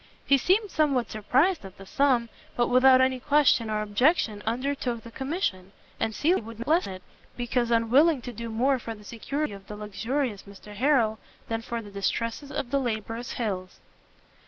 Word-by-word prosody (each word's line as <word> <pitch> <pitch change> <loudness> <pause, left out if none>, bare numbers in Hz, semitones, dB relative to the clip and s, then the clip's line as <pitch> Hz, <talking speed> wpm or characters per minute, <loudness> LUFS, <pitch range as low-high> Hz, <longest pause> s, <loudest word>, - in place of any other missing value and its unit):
He 275 -1 +4
seemed 395 - +2
somewhat 275 -6 +1
surprised 265 - +1
at 190 -1 -11
the 195 - -11
sum, 250 0 +2 0.3
but 240 - +1
without 255 +1 +6
any 260 0 +2
question 275 -4 +3
or 215 0 -1
objection 215 0 +2
undertook 245 -1 -2
the 230 - -11
commission: 245 - -3 0.3
and 220 - -1
Cecilia 335 +1 +2
would 225 0 -10
not 235 +2 -7
lessen 315 - +2
it, 185 0 -11 0.3
because 240 0 0
unwilling 255 +7 +4
to 245 - -6
do 235 +1 -6
more 255 +4 +1
for 225 -1 -6
the 210 - -15
security 255 +5 -3
of 195 -1 -12
the 210 - -7
luxurious 210 +2 -3
Mr 200 +1 -13
Harrel, 230 -2 +2 0.3
than 225 0 -1
for 230 0 -5
the 205 - -11
distresses 230 +7 -2
of 270 -4 -4
the 280 - +2
laborious 230 0 -3
Hills. 190 -6 -4
235 Hz, 180 wpm, -27 LUFS, 215-275 Hz, 0.3 s, without